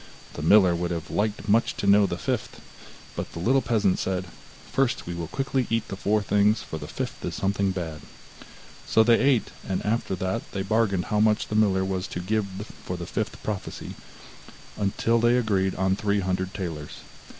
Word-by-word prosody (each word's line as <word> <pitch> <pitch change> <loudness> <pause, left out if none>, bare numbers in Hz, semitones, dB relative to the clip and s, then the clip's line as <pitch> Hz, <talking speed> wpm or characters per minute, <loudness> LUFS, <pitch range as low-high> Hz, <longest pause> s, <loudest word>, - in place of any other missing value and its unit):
The - - -6
miller 90 +2 +6
would 85 0 -2
have 85 -2 -4
liked 105 0 -1
much 110 +3 +2
to - - -3
know 100 0 +6
the 85 - -3
fifth, 75 - -3 0.6
but - - -5
the - - -6
little 130 +9 +3
peasant 110 -7 +1
said: 95 -1 -1 0.5
'First, 135 -2 +1
we 85 - -4
will 85 -1 -4
quickly 135 - -1
eat 115 -1 0
the - - -4
four 105 +2 +1
things, 105 +2 +3
for 80 - -6
the - - -7
fifth - - -5
is - - -3
something 100 0 0
bad.' 85 -5 -4 0.9
So 110 - +5
they 115 0 +5
ate, 135 -4 +2 0.2
and 95 - -1
after 105 -2 0
that 95 +1 -3
they 95 - -2
bargained 100 -2 +1
how 105 - +3
much 105 0 +2
the 105 - -2
miller 95 -3 +3
was 95 -1 -2
to - - -5
give 105 +3 0 0.4
for 90 - -4
the 85 - -5
fifth - - -4
prophecy, 105 -3 -5 0.8
until 110 +3 +1
they 120 +2 +4
agreed 100 -5 +1
on 95 0 +1
three 100 0 0
hundred 95 0 -1
talers. 80 -6 -5
100 Hz, 190 wpm, -26 LUFS, 95-110 Hz, 0.9 s, miller